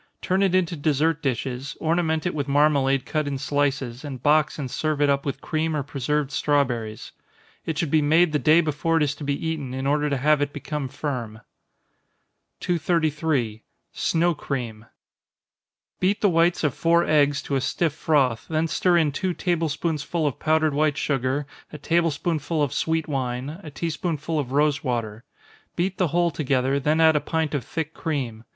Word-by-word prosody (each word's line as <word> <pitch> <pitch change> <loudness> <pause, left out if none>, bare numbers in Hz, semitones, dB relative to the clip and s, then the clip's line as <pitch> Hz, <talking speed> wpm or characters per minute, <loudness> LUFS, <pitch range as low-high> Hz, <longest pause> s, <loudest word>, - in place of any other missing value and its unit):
Turn 185 +2 0
it 190 -2 +3
into 180 -2 +1
dessert 155 +1 +1
dishes, 130 +1 -3
ornament 160 -1 0
it 175 - 0
with 145 -2 -3
marmalade 140 -2 +3
cut 155 -2 -1
in 140 -1 -2
slices, 135 -2 -1
and 135 -4 -7
box 150 0 +3
and 135 -4 -5
serve 155 -2 -1
it 145 -1 +4
up 140 0 -1
with 135 -1 -3
cream 160 0 -1
or 145 - -1
preserved 145 +1 -2
strawberries. 125 -7 -1 0.6
It 160 -2 -2
should 160 -3 -1
be 155 - +4
made 160 +3 +4
the 150 - +1
day 155 +3 +5
before 160 +1 0
it 160 - +3
is 145 -1 0
to 150 - -9
be 140 +3 -2
eaten, 145 -6 -3
in 135 0 -3
order 150 +1 +1
to 140 - 0
have 150 +2 +3
it 145 0 -1
become 145 -1 -4
firm. 120 -6 -5 1.2
233. 155 -9 0 0.3
Snow 170 +1 +1
Cream. 120 -7 -5 1.1
Beat 195 +3 +1
the 205 - +4
whites 170 +1 +2
of 150 -4 +1
four 170 +4 +3
eggs 145 -2 +2
to 140 - -2
a 135 - +1
stiff 160 +3 0
froth 135 -7 +1
then 160 0 0
stir 175 +2 +2
in 155 -3 +2
two 180 +5 -2
table 170 -3 0
spoonsful 155 +1 -2
of 145 - -2
powdered 155 -1 +2
white 150 0 +1
sugar, 135 +1 -1 0.3
a 150 - -7
table 165 +3 +1
spoonful 155 0 -1
of 140 - -1
sweet 160 -1 0
wine, 135 +2 -3
a 160 - -9
tea 165 +3 -3
spoonful 155 -1 -2
of 130 -3 -3
rosewater. 125 -7 0 0.5
Beat 185 +2 -1
the 180 - +3
whole 170 +2 +1
together, 135 -2 0
then 150 +3 +1
add 160 -1 +5
a 150 - +2
pint 160 -2 -1
of 140 -4 -1
thick 160 +5 -4
cream. 125 -8 -4
150 Hz, 185 wpm, -24 LUFS, 135-160 Hz, 1.2 s, day